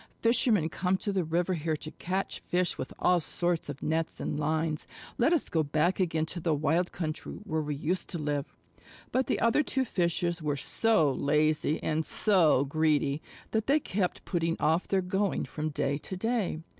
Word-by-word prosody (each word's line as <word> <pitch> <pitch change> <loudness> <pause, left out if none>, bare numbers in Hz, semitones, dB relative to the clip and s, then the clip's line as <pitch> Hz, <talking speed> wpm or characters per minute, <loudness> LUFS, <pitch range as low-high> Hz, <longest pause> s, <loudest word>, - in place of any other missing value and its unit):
Fishermen 230 -7 +3
come 180 +3 0
to 205 - -3
the 190 -2 +1
river 170 +3 0
here 160 -1 -1
to 155 +1 -7
catch 190 +2 -3
fish 180 -1 0
with - - -6
all 180 -1 +3
sorts 175 0 -1
of 145 -1 -6
nets 160 +1 -1
and 145 - -3
lines. 155 +1 -1 0.3
Let 245 +7 +4
us 340 - +2
go 160 - +1
back 155 +5 +1
again 165 -4 +1
to 175 - -5
the 165 -2 +1
wild 160 +5 +1
country 155 -3 -4
where 160 -6 -1
we 150 -1 -3
used 170 +5 -2
to 175 - -1
live." 145 -2 -2 0.6
But 260 0 +1
the - - 0
other 230 +5 +3
two 265 -2 0
Fishes 175 -3 0
were 150 -2 -1
so 160 +1 +2
lazy 150 +2 +1
and 160 0 0
so 165 -9 +4
greedy 150 -1 +1 0.3
that 220 -1 0
they 285 +3 +4
kept 190 -9 -2
putting 165 -2 -1
off 160 +3 +1
their 190 -1 +1
going 190 +2 0
from 155 0 -4
day 140 -1 -1
to 185 - -7
day. 220 -6 -1
165 Hz, 185 wpm, -29 LUFS, 155-190 Hz, 0.6 s, Let